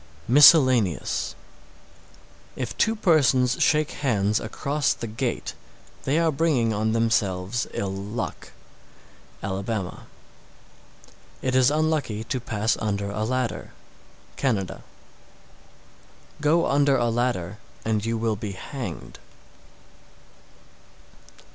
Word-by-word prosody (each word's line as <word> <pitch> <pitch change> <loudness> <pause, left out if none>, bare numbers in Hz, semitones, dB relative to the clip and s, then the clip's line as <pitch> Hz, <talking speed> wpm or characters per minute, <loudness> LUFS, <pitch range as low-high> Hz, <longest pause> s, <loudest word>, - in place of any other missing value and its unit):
_ - - +1
MISCELLANEOUS. 130 - +5 1.2
663. - - -3
If 120 - -5
two 220 - +2
persons 135 - +3
shake 150 -1 +3
hands 105 -6 +1
across 140 +5 -1
the - - -6
gate, 110 0 -3 0.5
they 140 +3 +1
are 165 -1 +3
bringing 135 -7 +1
on 110 +1 0
themselves 110 -2 0
ill 95 -1 -3
luck. 105 +4 -5 0.9
Alabama. 95 0 -4 1.3
664. - - -4
It 130 - 0
is 130 0 +5
unlucky 150 -8 0
to 125 +3 -3
pass 110 -2 -1
under 100 -2 -2
a 105 +1 -2
ladder. 125 +1 -2 0.6
Canada. 110 -9 -1 1.6
665. - - -13
Go 160 +3 +3
under 140 -1 +3
a 120 -1 +1
ladder 115 -5 -1 0.3
and 110 -2 0
you 115 0 -1
will 110 -1 0
be 100 -1 -5
hanged. 130 +6 -7
115 Hz, 110 wpm, -24 LUFS, 105-140 Hz, 1.6 s, MISCELLANEOUS